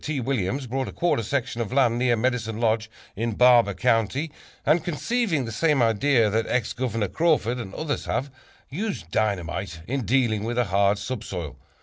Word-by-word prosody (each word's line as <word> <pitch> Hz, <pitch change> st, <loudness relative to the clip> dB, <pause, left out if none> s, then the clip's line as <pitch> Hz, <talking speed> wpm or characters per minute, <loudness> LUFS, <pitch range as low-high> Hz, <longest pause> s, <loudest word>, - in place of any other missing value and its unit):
T. 155 Hz, -3 st, -2 dB
Williams 130 Hz, 0 st, -1 dB
bought 130 Hz, +2 st, -2 dB
a -, -, -5 dB
quarter 175 Hz, -9 st, +1 dB
section 120 Hz, +1 st, -2 dB
of 110 Hz, -, -4 dB
land 125 Hz, -3 st, +3 dB
near 125 Hz, -1 st, +3 dB
Medicine 115 Hz, -2 st, -1 dB
Lodge 110 Hz, -1 st, +1 dB, 0.3 s
in 115 Hz, +2 st, -2 dB
Barber 120 Hz, -3 st, +5 dB
County, 125 Hz, +6 st, +1 dB, 0.3 s
and, 155 Hz, +2 st, +3 dB
conceiving 175 Hz, -, -1 dB
the 115 Hz, -, -5 dB
same 150 Hz, +5 st, +2 dB
idea 115 Hz, +1 st, +3 dB
that 110 Hz, +2 st, 0 dB
Ex 125 Hz, -4 st, 0 dB
Governor 115 Hz, -4 st, -1 dB
Crawford 135 Hz, -, +1 dB
and 105 Hz, -5 st, -6 dB
others 155 Hz, -2 st, -3 dB
have, 135 Hz, +3 st, -2 dB, 0.4 s
used 175 Hz, -, -4 dB
dynamite 95 Hz, -4 st, -2 dB
in 135 Hz, +1 st, -2 dB
dealing 115 Hz, -2 st, +1 dB
with 120 Hz, +2 st, -3 dB
a 125 Hz, -, +4 dB
hard 100 Hz, +1 st, +2 dB
subsoil. 100 Hz, -, -5 dB
120 Hz, 170 wpm, -25 LUFS, 110-135 Hz, 0.4 s, Barber